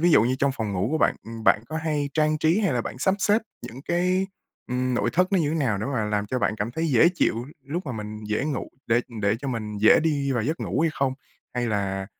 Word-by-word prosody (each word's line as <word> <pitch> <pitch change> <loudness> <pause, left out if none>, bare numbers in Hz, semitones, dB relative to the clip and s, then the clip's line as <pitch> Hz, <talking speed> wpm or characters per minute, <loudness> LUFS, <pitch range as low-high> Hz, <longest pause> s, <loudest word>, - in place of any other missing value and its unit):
ví 175 +2 +4
dụ 150 - +6
như 125 +3 +1
trong 140 0 +2
phòng 110 -5 -3
ngủ 95 +2 0
của 160 - +1
bạn, - - +3
ừm, 115 0 -8
bạn 105 - +5
có 155 - -4
hay 150 -3 -1
trang 155 0 +2
trí 160 +6 +3
hay 195 -6 +1
là 125 - +1
bạn 110 - -6
sắp 190 +8 +2
xếp 205 +2 +3 0.2
những 125 +4 -9
cái, 180 +3 +1 0.4
ừm, 125 0 -1
nội - - +1
thất 180 +2 +2
nó 195 - +4
như 155 -4 +1
thế - - -1
nào 125 -10 +1
để 105 - -3
mà 130 -6 -1
làm 105 -1 -1
cho 130 +5 -1
bạn 115 - +1
cảm 110 +2 -2
thấy 160 +7 -2
dễ 135 +4 +6
chịu 120 -7 0 0.2
lúc 160 +5 -4
mà 130 - -3
mình 105 -1 -6
dễ 105 +4 -1
ngủ 145 -4 -3 0.2
để 115 +2 +3 0.2
để 100 +2 +2
cho 140 - -4
mình 110 -4 -4
dễ 110 +2 +6
đi 145 -4 +1
vào 120 -3 0
giấc 155 +8 -2
ngủ 130 - -1
hay 165 0 +3
không? 135 -1 0 0.4
Hay 120 -1 0
là, 100 -3 -1
130 Hz, 270 wpm, -25 LUFS, 110-155 Hz, 0.4 s, dụ